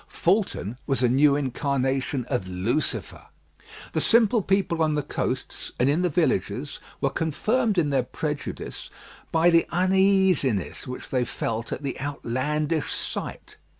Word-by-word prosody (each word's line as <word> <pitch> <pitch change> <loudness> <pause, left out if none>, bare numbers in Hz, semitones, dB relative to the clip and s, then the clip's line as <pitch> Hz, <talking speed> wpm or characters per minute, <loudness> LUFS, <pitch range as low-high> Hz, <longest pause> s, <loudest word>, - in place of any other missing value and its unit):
Fulton 170 - 0
was 135 -2 +1
a - - +5
new 140 +3 +4
incarnation 135 -1 -1
of 125 -7 -2
Lucifer. 95 +11 -2 0.7
The - - +1
simple 230 -1 +4
people 190 -4 +1
on 155 -1 +2
the 150 - 0
coasts - - -4
and 125 - +3
in 150 +5 +2
the 180 - +2
villages 140 - 0 0.2
were - - +1
confirmed 210 - 0
in 150 -4 +2
their 135 -2 +3
prejudice 150 +3 -5 0.4
by 165 +2 +4
the 165 0 +4
uneasiness 185 - +2
which 125 - -7
they 125 -2 +1
felt 115 -1 -3
at 145 - -4
the 135 -3 -4
outlandish 145 +3 -1
sight. - - -5
145 Hz, 140 wpm, -25 LUFS, 130-175 Hz, 0.7 s, a